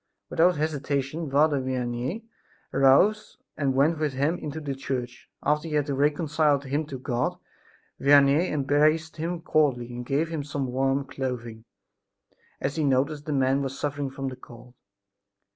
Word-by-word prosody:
Without 175 0 +3
hesitation, 145 0 -2
Father 145 0 +3
Vianney 130 - -3 0.5
arose 200 +11 +3 0.2
and 140 -3 0
went 150 +4 +3
with 150 -3 0
him 140 +6 +1
into 150 +1 -5
the 145 -3 -4
church. 125 -2 -5
After 150 +3 +1
he 155 - -3
had 145 0 0
reconciled 145 +1 +1
him 145 +3 -1
to 140 -3 -6
God 125 -1 -2 0.6
Vianney 140 +4 +5
embraced 155 +3 +1
him 170 +2 -3
cordially 130 -8 +1
and 120 0 -5
gave 145 +6 0
him 160 -3 -3
some 140 -1 -3
warm 135 +2 0
clothing, 120 -4 -5 0.9
as 145 - -2
he 155 - +1
noticed 140 +2 +1
the - - -2
man 135 0 +2
was 135 -1 -4
suffering 145 -1 -2
from 135 0 -4
the 130 - -8
cold. 120 -1 -14
140 Hz, 150 wpm, -26 LUFS, 130-155 Hz, 0.9 s, Vianney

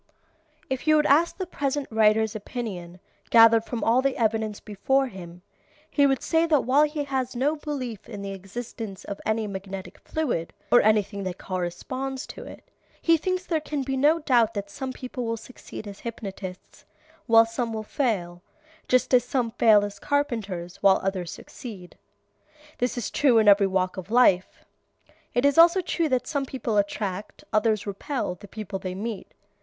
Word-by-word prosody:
If 265 +3 -4
you 310 - +6
would 300 -1 +3
ask 320 +5 +3
the 375 - -3
present 285 -4 -2
writer's 220 0 +3
opinion, 195 -6 -6 0.3
gathered 230 -1 +7
from 235 -1 -4
all 240 +3 +4
the 275 0 0
evidence 220 -2 0
before 265 +6 0
him, 180 -6 -10 0.5
he 285 -1 +4
would 270 -1 0
say 330 0 +2
that 300 -4 +4
while 280 +4 +4
he 300 -1 -3
has 260 -3 -2
no 280 +5 +1
belief 265 -8 -5
in 205 -3 -7
the 200 - -4
existence 195 +1 -7
of 200 - -7
any 220 0 +1
magnetic 195 -1 -7
fluid, 250 - -2 0.2
or 245 - +7
anything 210 -1 +2
that 185 -1 -4
corresponds 255 +9 -4
to - - -9
it, - - -11 0.4
he 330 - +4
thinks 370 +3 -2
there 320 -3 0
can 295 -2 -3
be 270 0 -2
no 295 +5 +4
doubt 245 -8 +2
that 200 0 -4
some 265 +4 -5
people 255 0 -6
will 230 0 -2
succeed 225 -2 -10
as 200 -1 -9
hypnotists 195 -5 -8 0.4
while 225 0 +7
some 230 +1 -3
will 220 -1 -4
fail, 195 - -2 0.5
just 255 +1 +2
as 245 -1 +6
some 245 -2 -1
fail 215 -3 +5
as 205 -1 -8
carpenters 205 -12 -2
while 195 -1 +4
others 190 -3 -2
succeed. 195 -8 -10 0.8
This 245 +1 -1
is 240 - -3
true 265 -6 +4
in 220 -1 +4
every 200 -1 +6
walk 185 0 -1
of 185 +1 -7
life. 215 -6 +3 0.7
It 245 +3 +2
is 285 +3 +4
also 340 +3 +7
true 335 -3 -1
that 250 -2 +1
some 280 -2 -2
people 245 -5 -2
attract, 200 -1 -2
others 215 -1 +2
repel, 210 +2 -3
the 205 +3 -13
people 210 -2 -6
they 185 -1 -5
meet. 210 +1 -5
225 Hz, 175 wpm, -25 LUFS, 200-270 Hz, 0.8 s, gathered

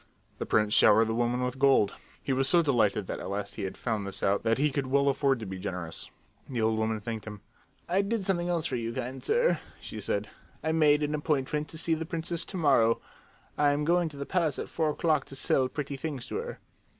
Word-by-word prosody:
The - - -3
prince 105 -1 +2
showered 110 +1 +6
the 110 - -2
old 115 - -1
woman 120 +1 +1
with 125 +1 -3
gold. 135 -7 +4 0.3
He 135 - 0
was 135 +1 +2
so 175 -1 +5
delighted 115 -8 +2
that - - -5
at - - -6
last 100 +1 -3
he 100 - -4
had 95 - -6
found 110 -4 -2
this 95 0 -5
out 100 +1 +2
that 115 0 +1
he 145 +2 +2
could 135 -1 -2
well 140 +1 +3
afford 135 -1 +2
to - - -4
be 95 -1 -6
generous. 90 -4 -5 0.4
The 125 -3 -3
old 110 0 +1
woman 110 0 0
thanked 110 0 -5
him. 105 -2 -8 0.5
"I 185 +3 +2
did 200 0 -2
something 175 -2 0
else 170 -2 0
for 130 - -1
you, 115 0 -3
kind 130 +1 -5
sir," 485 +2 +2 0.2
she - - -7
said. - - -2 0.4
"I 160 - +1
made 150 -2 +4
an 150 +1 -1
appointment 150 0 -1
to 160 - -8
see 165 +1 +1
the 160 0 -3
princess 165 0 -2
to 190 - -6
morrow. 125 -8 +4 0.6
I 145 -1 +4
am 150 +1 -1
going 175 0 +2
to 145 - -10
the 140 - -4
palace 165 -5 0
at - - -5
four 160 -2 0
o'clock 155 -2 +1
to 135 - -9
sell 130 0 +2
pretty 140 -1 -4
things 135 -3 -4
to - - -3
her." 475 +2 -5
135 Hz, 240 wpm, -29 LUFS, 115-155 Hz, 0.6 s, showered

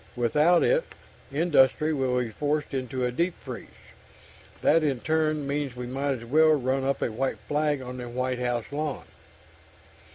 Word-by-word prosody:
Without 150 +9 +3
it, - - +3 0.5
industry 155 0 +3
will 130 -3 0
be 120 -3 -2
forced 150 +4 -2
into 130 -1 -2
a 125 - 0
deep 170 +7 0
freeze. 125 -4 -8 1.0
That 165 - +4
in 140 -5 0
turn 155 0 0
means 140 -2 -2
we 125 0 -5
might 135 +3 -1
as 115 -3 -7
well 155 +5 +5
run 135 -1 0
up 135 +1 0
a - - -1
white 125 +1 -2
flag 145 +5 -1
on 125 0 -7
the 125 -1 -6
White 125 +1 -2
House 120 -2 -1
lawn." 145 - -3
135 Hz, 165 wpm, -27 LUFS, 125-150 Hz, 1.0 s, well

